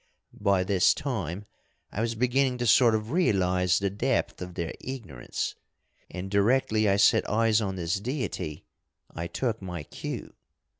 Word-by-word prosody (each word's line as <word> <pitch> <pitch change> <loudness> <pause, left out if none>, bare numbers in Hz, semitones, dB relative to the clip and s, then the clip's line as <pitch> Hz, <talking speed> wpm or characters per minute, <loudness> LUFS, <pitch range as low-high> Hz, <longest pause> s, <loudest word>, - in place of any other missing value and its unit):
By 100 -2 +3
this 95 -1 +3
time 105 - -3 0.5
I 105 - -3
was 115 0 -1
beginning 125 +2 +1
to 120 - -2
sort 115 0 +5
of 110 +2 -3
realise 90 - +2
the 100 0 0
depth 120 +3 -1
of 90 -1 -7
their 85 -3 -3
ignorance, 110 - -5 0.6
and 95 +1 -6
directly 110 0 +3
I 100 - +4
set 100 - +4
eyes 115 +1 +3
on 95 -2 -2
this 90 +1 -1
deity 100 - -4 0.5
I 85 +1 -4
took 115 +2 -2
my 90 -4 -5
cue. - - -6
100 Hz, 150 wpm, -27 LUFS, 90-120 Hz, 0.6 s, sort